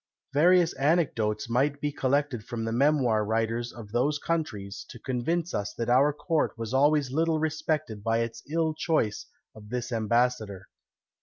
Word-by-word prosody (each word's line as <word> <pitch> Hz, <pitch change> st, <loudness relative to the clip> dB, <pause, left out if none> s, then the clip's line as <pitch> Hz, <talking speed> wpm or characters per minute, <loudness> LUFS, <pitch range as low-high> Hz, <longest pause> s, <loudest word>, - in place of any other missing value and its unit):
Various 170 Hz, +3 st, +4 dB
anecdotes 135 Hz, -6 st, +1 dB
might 135 Hz, +5 st, +1 dB
be 145 Hz, 0 st, -1 dB
collected 140 Hz, -3 st, 0 dB
from 115 Hz, 0 st, -4 dB
the 115 Hz, -, -2 dB
memoir 125 Hz, -4 st, +2 dB
writers 115 Hz, +2 st, -1 dB
of 110 Hz, -3 st, -11 dB
those 135 Hz, +6 st, +1 dB
countries, 125 Hz, -12 st, -3 dB
to -, -, -9 dB
convince 145 Hz, +8 st, -2 dB
us 100 Hz, 0 st, -3 dB
that 115 Hz, 0 st, -3 dB
our 135 Hz, +4 st, +5 dB
court 155 Hz, -1 st, -1 dB
was 115 Hz, +1 st, -5 dB
always 145 Hz, 0 st, +3 dB
little 160 Hz, +2 st, +1 dB
respected 155 Hz, -7 st, -2 dB
by 115 Hz, +1 st, +1 dB
its 115 Hz, 0 st, -4 dB
ill 160 Hz, 0 st, +1 dB
choice 155 Hz, -9 st, -1 dB, 0.3 s
of 105 Hz, -1 st, -13 dB
this 125 Hz, +1 st, -3 dB
ambassador. 110 Hz, -3 st, 0 dB
125 Hz, 155 wpm, -27 LUFS, 115-150 Hz, 0.3 s, our